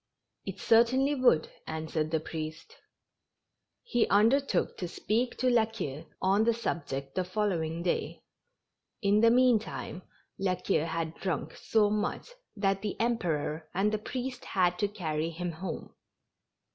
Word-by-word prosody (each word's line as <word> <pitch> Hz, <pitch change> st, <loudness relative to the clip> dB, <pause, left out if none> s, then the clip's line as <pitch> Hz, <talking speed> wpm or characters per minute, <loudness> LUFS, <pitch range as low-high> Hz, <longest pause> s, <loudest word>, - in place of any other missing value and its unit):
"It 195 Hz, +1 st, -5 dB
certainly 255 Hz, +5 st, +4 dB
would," 255 Hz, -, +4 dB, 0.2 s
answered 160 Hz, 0 st, -2 dB
the 160 Hz, 0 st, +1 dB
priest. 155 Hz, -, -6 dB
And -, -, -18 dB, 1.1 s
he 240 Hz, -, +1 dB
undertook 230 Hz, +8 st, +3 dB
to 180 Hz, -, -2 dB
speak 230 Hz, +8 st, -1 dB
to 255 Hz, -, +1 dB
La 240 Hz, -3 st, +5 dB
Queue 165 Hz, -9 st, -6 dB
on 195 Hz, +3 st, +3 dB
the 230 Hz, 0 st, +3 dB
sub 170 Hz, -10 st, -3 dB
ject 135 Hz, 0 st, -4 dB
the 185 Hz, -, 0 dB
following 175 Hz, -4 st, -1 dB
day. 175 Hz, -, -2 dB, 0.8 s
In 200 Hz, +1 st, +4 dB
the 230 Hz, -, +7 dB
meantime. 235 Hz, -6 st, +2 dB, 0.4 s
La 190 Hz, -1 st, +1 dB
Queue 180 Hz, -3 st, 0 dB
had 165 Hz, -1 st, -2 dB
drunk 180 Hz, -5 st, -3 dB
so 210 Hz, -2 st, +2 dB
much 210 Hz, -, -2 dB, 0.2 s
that 195 Hz, -2 st, +1 dB
the 210 Hz, -1 st, -4 dB
Emperor 160 Hz, -9 st, -1 dB
and 200 Hz, +3 st, +2 dB
the 215 Hz, -, -1 dB
priest 250 Hz, +3 st, -5 dB
had 180 Hz, -2 st, +1 dB
to 205 Hz, -, +2 dB
carry 165 Hz, -5 st, -2 dB
him 175 Hz, +1 st, -4 dB
home. 165 Hz, +1 st, -6 dB
195 Hz, 145 wpm, -30 LUFS, 165-225 Hz, 1.1 s, the